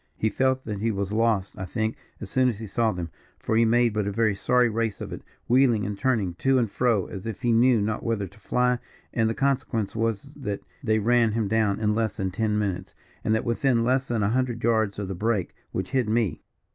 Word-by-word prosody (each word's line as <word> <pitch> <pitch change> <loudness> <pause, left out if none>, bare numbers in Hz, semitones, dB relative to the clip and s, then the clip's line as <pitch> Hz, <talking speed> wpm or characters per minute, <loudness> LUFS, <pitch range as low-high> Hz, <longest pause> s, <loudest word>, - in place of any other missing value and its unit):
He 110 - 0
felt 130 +3 +1
that 105 -3 -4
he 115 +3 0
was 100 -1 -2
lost, 110 -3 +1
I 95 - -3
think, 110 +3 -2 0.2
as 105 - -7
soon 130 -1 +3
as 115 - -3
he 110 - -7
saw 110 +2 +1
them, 85 -4 -5 0.3
for 110 - -2
he 115 +1 +5
made 120 0 +3
but 105 -2 -1
a - - -1
very 110 0 +2
sorry 125 +5 +3
race 115 -2 -1
of - - -6
it, - - -7 0.3
wheeling 120 -4 +4
and 100 +1 -3
turning 110 -6 0
to 135 0 +3
and 115 -5 +1
fro, 115 -6 +1
as 95 +2 -7
if 115 +3 -6
he 120 - +3
knew 120 +1 +5
not 105 +1 -1
whither 115 -4 -1
to 95 - -14
fly, 125 +3 +1 0.3
and 110 -1 +2
the 115 - -2
consequence 130 -6 0
was 115 -2 0
that 105 -8 -4 0.2
they 110 -3 +2
ran 115 0 +3
him 110 -2 0
down 110 -1 +1
in 105 -1 +1
less 110 0 -1
than 95 -3 -2
ten 105 +2 0
minutes, 100 -4 -3 0.3
and 110 - +2
that 110 - -1
within 120 0 +2
less 130 +2 +1
than 115 -3 0
a 100 - +2
hundred 120 -1 -1
yards 110 -3 +2
of 100 -2 -3
the 95 - -3
brake 105 0 -1 0.2
which - - -3
hid 130 -5 +1
me. 110 -8 0
110 Hz, 235 wpm, -25 LUFS, 105-120 Hz, 0.3 s, he